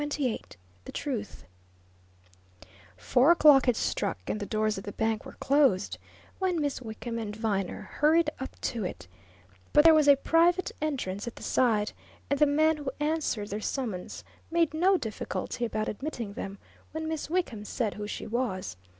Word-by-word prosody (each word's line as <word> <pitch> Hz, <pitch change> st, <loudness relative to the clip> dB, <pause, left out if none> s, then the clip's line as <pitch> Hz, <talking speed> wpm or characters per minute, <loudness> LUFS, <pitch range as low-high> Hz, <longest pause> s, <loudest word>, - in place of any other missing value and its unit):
CHAPTER 295 Hz, -, -3 dB
XXVIII 260 Hz, -6 st, -1 dB, 0.4 s
THE -, -, -7 dB
TRUTH 245 Hz, -8 st, -4 dB, 1.5 s
Four 245 Hz, -, +3 dB
o'clock 300 Hz, -6 st, +7 dB
had 245 Hz, -, +4 dB
struck, -, -, -1 dB
and 215 Hz, -, -2 dB
the 205 Hz, -, -4 dB
doors 215 Hz, -2 st, 0 dB
of -, -, -10 dB
the 205 Hz, -, -6 dB
bank 220 Hz, -1 st, -1 dB
were -, -, -10 dB
closed 270 Hz, -9 st, +2 dB, 0.4 s
when 370 Hz, -3 st, +1 dB
Miss 285 Hz, -3 st, -1 dB
Wickham 230 Hz, 0 st, -5 dB
and 210 Hz, -2 st, -5 dB
Viner 205 Hz, -4 st, -2 dB
hurried 310 Hz, +1 st, +2 dB
up 265 Hz, -, -7 dB
to 230 Hz, -4 st, -2 dB
it, 90 Hz, -, -6 dB, 0.7 s
but 295 Hz, -, +7 dB
there 325 Hz, 0 st, +8 dB
was 305 Hz, -2 st, +4 dB
a 285 Hz, -, +9 dB
private 335 Hz, +5 st, +3 dB
entrance 245 Hz, -10 st, -2 dB
at 235 Hz, -, -5 dB
the -, -, -11 dB
side, 215 Hz, -4 st, +2 dB, 0.4 s
and 280 Hz, -, +2 dB
the 300 Hz, -, +6 dB
man 310 Hz, +2 st, +3 dB
who 290 Hz, -2 st, -4 dB
answered 295 Hz, -9 st, -1 dB
their 210 Hz, +2 st, -4 dB
summons 215 Hz, -8 st, -4 dB, 0.3 s
made 335 Hz, -2 st, +2 dB
no 370 Hz, +5 st, +4 dB
difficulty 230 Hz, -, -4 dB
about 215 Hz, -1 st, -2 dB
admitting 235 Hz, -4 st, -4 dB
them 195 Hz, 0 st, -6 dB, 0.4 s
when 315 Hz, 0 st, -3 dB
Miss 315 Hz, -2 st, -3 dB
Wickham 320 Hz, -, -1 dB
said 215 Hz, 0 st, -2 dB
who 210 Hz, 0 st, -6 dB
she -, -, -5 dB
was. 200 Hz, -, -2 dB
255 Hz, 170 wpm, -28 LUFS, 215-305 Hz, 1.5 s, a